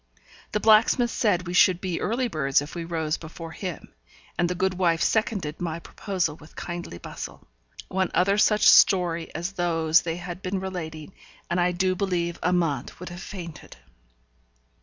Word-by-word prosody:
The 210 Hz, -, +1 dB
blacksmith 225 Hz, +3 st, +4 dB
said 185 Hz, -6 st, +1 dB
we 175 Hz, -, -4 dB
should 180 Hz, 0 st, +5 dB
be 185 Hz, -3 st, -3 dB
early 245 Hz, +3 st, 0 dB
birds 140 Hz, -, +1 dB
if 145 Hz, +1 st, -7 dB
we 170 Hz, -1 st, -5 dB
rose 160 Hz, -2 st, -1 dB
before 165 Hz, 0 st, -9 dB
him; 180 Hz, 0 st, -7 dB, 0.4 s
and 175 Hz, 0 st, +1 dB
the 180 Hz, -, -2 dB
good 190 Hz, +1 st, +1 dB
wife 170 Hz, -3 st, +1 dB
seconded 200 Hz, -9 st, 0 dB
my 165 Hz, -2 st, -2 dB
proposal 175 Hz, -2 st, -3 dB
with 155 Hz, 0 st, -17 dB
kindly 175 Hz, -, -6 dB
bustle. -, -, -8 dB, 0.4 s
One 190 Hz, -1 st, 0 dB
other 200 Hz, +3 st, +3 dB
such 210 Hz, 0 st, +4 dB
story 170 Hz, -4 st, +5 dB
as 175 Hz, +3 st, -3 dB
those 165 Hz, -3 st, +2 dB
they 165 Hz, -1 st, -3 dB
had 175 Hz, +1 st, -7 dB
been 190 Hz, +1 st, -2 dB
relating, 175 Hz, -3 st, -6 dB, 0.4 s
and 175 Hz, +1 st, +2 dB
I 180 Hz, +1 st, +3 dB
do 185 Hz, +1 st, +1 dB
believe 175 Hz, -3 st, -1 dB
Amante 165 Hz, -7 st, 0 dB
would 180 Hz, -, -7 dB
have 175 Hz, +1 st, -8 dB
fainted. 170 Hz, -6 st, -9 dB
175 Hz, 165 wpm, -25 LUFS, 165-190 Hz, 0.4 s, should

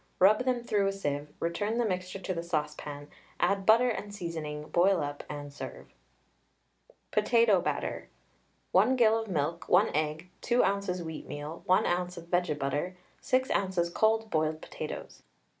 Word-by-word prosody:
Rub 210 Hz, +6 st, +5 dB
them 250 Hz, -2 st, 0 dB
through 205 Hz, -4 st, +1 dB
a -, -, +2 dB
sieve, 145 Hz, -6 st, -3 dB
return 205 Hz, +7 st, -1 dB
the 240 Hz, -, +2 dB
mixture 185 Hz, -2 st, -2 dB
to 190 Hz, 0 st, -3 dB
the 170 Hz, -, -3 dB
saucepan, 150 Hz, -3 st, -4 dB, 0.3 s
add 195 Hz, -1 st, +1 dB
butter 230 Hz, +3 st, +6 dB
and 205 Hz, -2 st, -5 dB
seasoning, 160 Hz, -5 st, -5 dB
boil 185 Hz, +1 st, +4 dB
up, 145 Hz, 0 st, -5 dB
and 145 Hz, -1 st, -6 dB
serve. -, -, -9 dB, 1.2 s
POTATO 230 Hz, -6 st, +4 dB
BATTER. -, -, -3 dB, 0.6 s
1 215 Hz, +8 st, +4 dB
gill 225 Hz, -2 st, +4 dB
of 225 Hz, -, -5 dB
milk, 165 Hz, -2 st, -2 dB
1 195 Hz, +5 st, +5 dB
egg, 155 Hz, +3 st, -2 dB
2 240 Hz, +1 st, +3 dB
oz. 195 Hz, -2 st, 0 dB
wheatmeal, 155 Hz, -1 st, -6 dB
1 185 Hz, -, +4 dB
oz. 180 Hz, 0 st, -1 dB
of 170 Hz, 0 st, -10 dB
vege 175 Hz, -4 st, +1 dB
butter, 145 Hz, +6 st, -2 dB, 0.2 s
6 260 Hz, -1 st, +1 dB
oz. 185 Hz, -3 st, +1 dB
cold 220 Hz, +2 st, +2 dB
boiled 155 Hz, 0 st, +1 dB
potatoes. -, -, -7 dB
180 Hz, 155 wpm, -30 LUFS, 155-210 Hz, 1.2 s, butter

